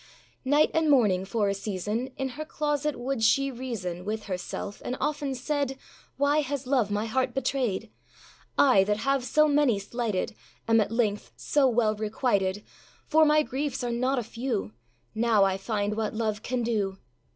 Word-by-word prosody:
Night 290 +3 +3
and 320 -1 +2
morning, 205 -9 +4
for 210 +1 0
a 200 - +1
season, 210 +5 -3
In 270 -1 -2
her 290 +5 -6
closet 300 -1 -1
would 255 -1 -2
she 275 +5 +3
reason 220 -9 -5
With 215 +2 -3
herself, 195 +1 -5
and 255 - -3
often 290 -2 -1
said, 275 +1 -2 0.4
âWhy 290 +2 +3
has 280 -1 -4
love 250 -5 +2
my 205 +1 -1
heart 255 +5 -1
betrayed? 245 -5 -1 0.7
âI, 250 -9 +6
that 210 +1 0
have 275 +3 0
so 305 +4 +3
many 285 -6 +3
slighted, 215 0 -2 0.3
Am 225 -1 +5
at 210 - -1
length 220 -3 -1
so 285 -2 +2
well 225 -3 +2
requited; 210 -2 0 0.4
For 315 +1 +4
my 305 0 +4
griefs 280 -1 -3
are 240 - -1
not 255 +3 0
a 245 - 0
few! 230 - -3 0.4
Now 220 -2 +3
I 195 -1 +2
find 205 +1 -2
what 220 -1 -2
love 215 -1 -1
can 245 +1 -2
do. 205 -4 -1
235 Hz, 170 wpm, -27 LUFS, 210-275 Hz, 0.7 s, âI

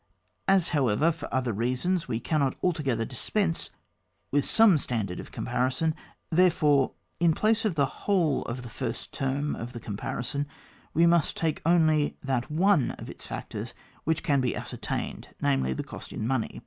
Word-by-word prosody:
As, 195 -3 +4
however, 145 +1 +3
for 165 -2 -8
other 125 -3 0
reasons 130 - 0
we 115 -3 -1
can 155 +5 0
not 135 -2 +1
altogether 140 -10 +1
dispense 165 - -1 0.6
with 145 0 +2
some 215 -8 +6
stan 115 -6 -1
dard 90 -2 -6
of - - -9
comparison, 130 +6 0 0.4
therefore, 160 -6 +4 0.3
in 165 -2 +4
place 220 +1 +2
of 200 -6 +1
the 140 -2 +3
whole 165 +1 +1
of 125 +1 -4
the 120 - -8
first 120 -1 -4
term 140 +2 -1
of 120 +2 -6
the 120 - -6
com 105 -3 -5
parison 140 +6 -3 0.5
we 165 - +5
must 170 -2 +3
take 160 -2 0
only 155 -3 +3
that 130 -1 -1
one 165 -2 +3
of - - -7
its - - -10
factors - - -6 0.3
which 160 0 0
can 140 -2 +3
be 125 - 0
ascertained, - - -5
namely, 65 -2 +1
the 65 - -2
cost - - -9
in 110 - -3
money. 125 -2 -1
145 Hz, 175 wpm, -28 LUFS, 125-165 Hz, 0.6 s, some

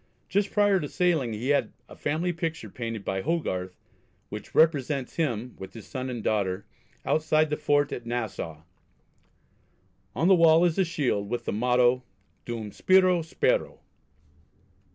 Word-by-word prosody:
Just 200 0 +1
prior 205 -2 +3
to 145 - -4
sailing 165 - +1
he 115 +5 -3
had 145 - +1
a - - -12
family 165 +4 -1
picture 165 - -4
painted 115 -4 -5
by 95 0 -1
Hogarth, 95 - -2 0.5
which - - -8
represents 145 -4 +2
him, 125 -7 -2
with 95 +2 -9
his 110 - -9
son 130 -1 -5
and 120 -3 -5
daughter, 100 -2 0 0.4
outside 155 0 +2
the - - +2
fort 145 -1 +1
at 120 - -5
Nassau. 105 -10 -4 1.5
On 165 - +2
the 195 - +7
wall 165 -1 +6
is 170 +1 +1
a 190 - +4
shield, 125 -11 -1
with 120 0 -3
the - - -2
motto 125 +2 +3 0.4
"Dum 115 -3 -5
spiro, 185 - +4
spero." 470 - 0
140 Hz, 150 wpm, -27 LUFS, 115-165 Hz, 1.5 s, the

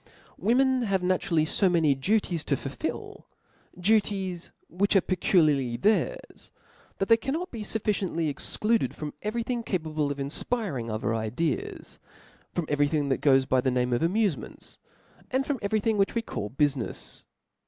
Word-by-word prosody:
Women 260 +3 +3
have 195 -5 0
naturally 175 -3 +1
fo 185 +4 +2
many 165 -5 +3
duties 175 +3 0
to - - +1
fulfil^ - - -5 0.5
fluties 195 -3 +1 0.2
which 200 +4 0
are - - +8
peculiarly 150 -10 +2
theirs, 220 - 0 0.5
that 195 - -1
they 230 - +6
can 270 +4 -3
not 360 +3 -4
be 230 - -6
fufficiently 200 -6 -1
excluded 150 - 0
from 150 -1 -6
every 225 +3 -2
thing 240 0 -2
capa 180 -8 -2
ble 150 -2 0
of 140 - -4
infpiring 140 - -2
other 110 +1 -1
ideas; 120 +7 -3 0.5
from 175 - -2
every 145 0 +2
thing 145 -2 0
that 135 - 0
^oes 135 -2 +4
by 130 -1 +3
the 130 - +1
qameof 125 -1 +1
amufementsj 190 +1 -1 0.5
and 260 +1 0
frooi 280 -3 -2
every 215 +1 +1
thing 215 -1 0
which 195 - +2
we 230 - 0
call 105 - -4
bufinefs. 135 -2 -2
180 Hz, 155 wpm, -27 LUFS, 140-215 Hz, 0.5 s, are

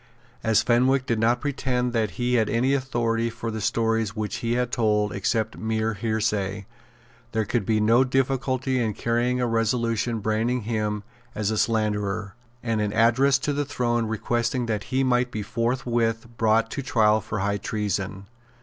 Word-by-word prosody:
As 110 -2 +3
Fenwick 130 +2 +3
did 115 -3 0
not 120 +2 +2
pretend 125 -4 -1
that 110 -3 +1
he 125 0 0
had 110 -3 +2
any 125 +4 +2
authority 120 -4 0
for 115 0 -5
the 110 0 -4
stories 115 0 0
which 110 -1 -3
he 115 0 -1
had 125 0 0
told 105 -3 +1
except 110 +3 -1
mere 110 0 -1
hearsay, 105 -2 -1 0.7
there 110 -1 +1
could 105 -1 -1
be 110 -1 +2
no 115 +4 +4
difficulty 130 0 0
in 110 -3 -1
carrying 120 +2 0
a 125 - +1
resolution 115 0 0
branding 110 +4 0
him 105 -1 -2 0.3
as 105 0 -1
a 110 - -1
slanderer, 105 -3 0 0.3
and 115 -2 0
an 105 -1 0
address 125 +4 +4
to 145 +1 -2
the 145 +1 0
throne 120 -5 -1
requesting 120 +3 -1
that 105 -3 -2
he 130 +1 0
might 125 -1 +2
be 110 -3 -4
forthwith 115 0 -1
brought 115 0 +2
to - - -3
trial 110 -4 +3
for 105 - -5
high 100 +1 0
treason. 100 -2 -3
115 Hz, 170 wpm, -25 LUFS, 110-125 Hz, 0.7 s, no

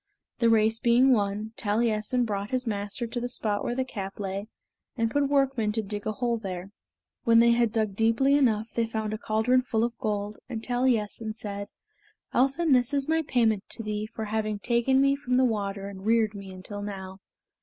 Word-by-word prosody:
The 235 - +4
race 225 0 +3
being 250 +2 +5
won, 210 0 -1
Taliessin 220 +3 +1
brought 200 -2 -3
his 255 0 -1
master 205 +2 -2
to 235 +1 -4
the 245 - -2
spot 210 -4 -1
where 240 - -2
the 260 0 0
cap 195 -6 -6
lay; 200 +1 -4 0.5
and 230 -1 +1
put 285 +1 +1
workmen 270 -6 +2
to 220 0 0
dig 205 +1 -5
a 215 - 0
hole 235 +1 -1
there. 190 -2 -6 0.5
When 230 0 +5
they 235 +1 +6
had 235 -1 +3
dug 215 -3 -1
deeply 230 +6 +3
enough 225 -6 +2
they 230 -1 0
found 220 -1 -3
a 215 - -4
caldron 230 +4 +2
full 225 -3 0
of 235 0 -1
gold, 210 -3 -2
and 225 -3 -5
Taliessin 230 -3 0
said, 200 -2 -6 0.7
"Elphin, 275 +6 +2
this 250 +2 +3
is 275 -1 0
my 320 +1 +2
payment 225 -8 +1
to 225 - -7
thee 210 0 -3
for 220 - -5
having 215 0 -1
taken 240 +5 +2
me 275 0 +4
from 255 -3 -2
the 260 0 +4
water 200 -4 -2
and 195 -1 -9
reared 220 0 +2
me 200 -1 -8
until 190 +2 -7
now." 190 -2 -7
225 Hz, 200 wpm, -27 LUFS, 205-245 Hz, 0.7 s, they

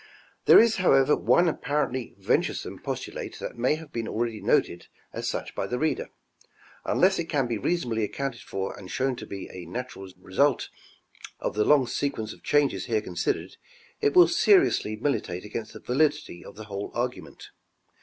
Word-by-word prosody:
— - - -34
There - - +10
is 230 0 +5
however 140 -6 +4
one 175 - +3
apparentlj'" 145 -5 -1
venturesome - - -1
postulate - - -5
that - - -6
may 125 +5 +2
have 155 -1 -11
been 115 -1 -3
already 115 -1 -2
noted 85 - +1 0.3
as - - -3
such - - -4
by - - -3
the 125 - -2
reader; 155 +4 -1 0.7
unless 190 0 +3
it 170 - -1
can 140 -5 +1
be 115 -3 -2
reasonably 120 - 0
accounted 130 +2 -3
for 95 0 -4
and 95 -2 -11
shown 130 +3 0
to 110 - -8
be 100 -1 -6
a 90 -2 -9
natural 110 -2 -6
result 125 +9 +1 0.7
of - - -2
the 105 0 +1
long 145 -3 +5
sequence 120 -3 -3
of - - -18
changes 145 -1 +1
here 110 -3 0
considered, 90 -4 -3 0.4
it 430 -2 +2
will 360 -1 +9
seriously 365 - +3
militate 105 -7 -2
against 110 +1 -6
the - - -9
validity 145 - 0
of - - -12
the 110 - -8
whole 100 -1 -5
argument. 125 +1 -4
125 Hz, 175 wpm, -26 LUFS, 105-150 Hz, 0.7 s, There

